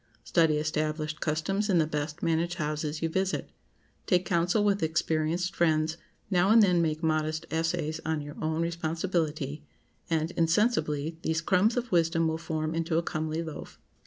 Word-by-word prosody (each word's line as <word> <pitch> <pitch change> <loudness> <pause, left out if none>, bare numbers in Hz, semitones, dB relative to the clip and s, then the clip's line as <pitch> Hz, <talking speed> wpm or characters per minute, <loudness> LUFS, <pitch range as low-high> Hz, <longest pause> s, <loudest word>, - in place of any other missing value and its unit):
Study 160 -3 +3
established 155 0 -2
customs 195 +7 -1
in 185 - +4
the 160 - +4
best 150 0 -4
managed 170 +1 +1
houses 155 -1 -3
you 165 - +1
visit; 190 +3 -1 0.6
take 180 -2 +3
counsel 175 +5 +2
with 200 -2 +2
experienced 160 +2 0
friends; 160 -1 +2 0.4
now 180 +1 +3
and 225 0 +7
then 180 -3 +4
make 155 0 -1
modest 155 0 0
essays 160 -1 -1
on 160 -1 -1
your 145 0 -8
own 160 +1 0
responsibility, 160 -3 -2 0.5
and, 160 0 0
insensibly, 165 -4 +1
these 160 0 0
crumbs 195 +7 +2
of 245 -1 -2
wisdom 165 -1 +2
will 160 0 -1
form 155 -1 -2
into 165 0 0
a 170 - +1
comely 155 0 -2
loaf. 160 -2 -8
160 Hz, 160 wpm, -28 LUFS, 155-175 Hz, 0.6 s, and